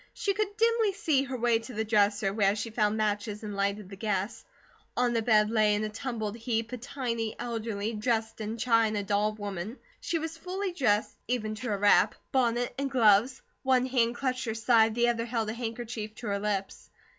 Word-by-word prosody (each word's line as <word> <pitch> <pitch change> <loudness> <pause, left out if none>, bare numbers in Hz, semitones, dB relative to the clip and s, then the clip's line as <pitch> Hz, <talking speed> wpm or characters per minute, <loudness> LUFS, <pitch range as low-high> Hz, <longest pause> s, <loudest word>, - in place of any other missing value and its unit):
She 400 - 0
could 410 0 -2
dimly 455 -2 +3
see 315 -9 +1
her 265 -1 -4
way 235 -1 +2
to 230 +1 -10
the 220 +1 -1
dresser, 205 -2 +2
where 200 -1 +3
she 225 +2 -4
found 215 -1 +1
matches 210 0 -1
and 210 -1 -5
lighted 200 0 -1
the 195 - -9
gas. 200 +1 -2 0.5
On 245 -1 +2
the 230 - +1
bed 215 -1 +3
lay 215 -2 +3
in 210 - -1
a 215 - -2
tumbled 220 -2 -4
heap 230 0 -2
a 250 - -4
tiny, 230 -3 -3
elderly, 225 -2 -3
Dresden 220 0 -2
china 225 -3 +2
doll 205 +1 +1
woman. 205 +2 -5 0.2
She 340 - -1
was 325 0 -5
fully 370 +2 -3
dressed, 220 -10 +1
even 215 -3 -1
to 225 +3 -5
her 205 - 0
wrap, 205 +1 +4 0.2
bonnet, 245 -2 +1
and 275 0 -1
gloves; 240 0 +4 0.2
one 260 -1 +3
hand 240 -2 +1
clutched 255 0 -2
her 225 -1 -2
side, 225 -1 +4
the 240 0 +3
other 230 -1 -1
held 225 -2 -1
a - - -4
handkerchief 230 -2 -5
to 235 - -7
her 200 0 0
lips. 200 -2 -3
225 Hz, 195 wpm, -29 LUFS, 210-250 Hz, 0.5 s, wrap